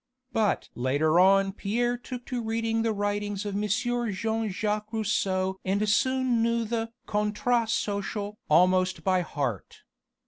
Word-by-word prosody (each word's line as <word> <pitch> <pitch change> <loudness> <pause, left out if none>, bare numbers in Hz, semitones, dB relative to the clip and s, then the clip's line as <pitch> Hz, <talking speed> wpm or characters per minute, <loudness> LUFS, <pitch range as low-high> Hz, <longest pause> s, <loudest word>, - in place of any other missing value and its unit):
But 215 -3 +1
later 145 +7 +2
on 195 +1 +5
Pierre 235 +5 -1
took 245 0 -8
to 250 -2 -3
reading 225 0 -1
the 225 0 +1
writings 205 0 -2
of 205 - -3
M. 205 +1 -1
Jean 225 -1 -1
Jacques 210 +2 -2
Rousseau 190 -4 0
and 200 +3 0
soon 260 +1 +2
knew 230 0 +1
the 225 0 -2
Contrat 215 +3 0
Social 205 -1 -2
almost 185 +3 +3
by 185 -1 +2
heart. 140 - -4
210 Hz, 135 wpm, -27 LUFS, 190-230 Hz, -, on